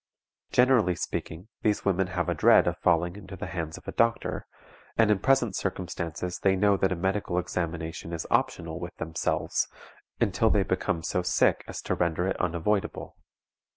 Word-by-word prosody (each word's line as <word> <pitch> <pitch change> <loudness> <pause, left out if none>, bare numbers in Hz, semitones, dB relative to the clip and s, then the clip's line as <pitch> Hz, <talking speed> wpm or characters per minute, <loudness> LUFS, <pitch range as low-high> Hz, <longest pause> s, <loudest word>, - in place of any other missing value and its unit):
Generally 125 -8 +4
speaking, 85 +2 -5
these 105 -1 +1
women 95 -1 +2
have 90 -2 -2
a - - +1
dread - - +5
of - - 0
falling 85 +2 +2
into 95 -1 -9
the - - -6
hands 80 -3 -4
of - - -15
a - - -2
doctor, 115 0 0 0.5
and 110 -2 +5
in 105 - +3
present 135 -3 +2
circumstances 90 -2 -3
they 95 -1 +3
know 100 +1 +4
that 95 0 +1
a - - +1
medical 95 0 -1
examination 85 -2 -3
is 85 -1 -4
optional 90 -10 0
with 85 0 -7
themselves, 80 0 -1 0.5
until 110 +3 +2
they 105 -2 +3
become 95 -3 -1
so 90 - 0
sick 90 - +2
as - - -6
to - - -1
render 85 0 0
it 95 - 0
unavoidable. 90 +4 -1
90 Hz, 170 wpm, -27 LUFS, 85-100 Hz, 0.5 s, dread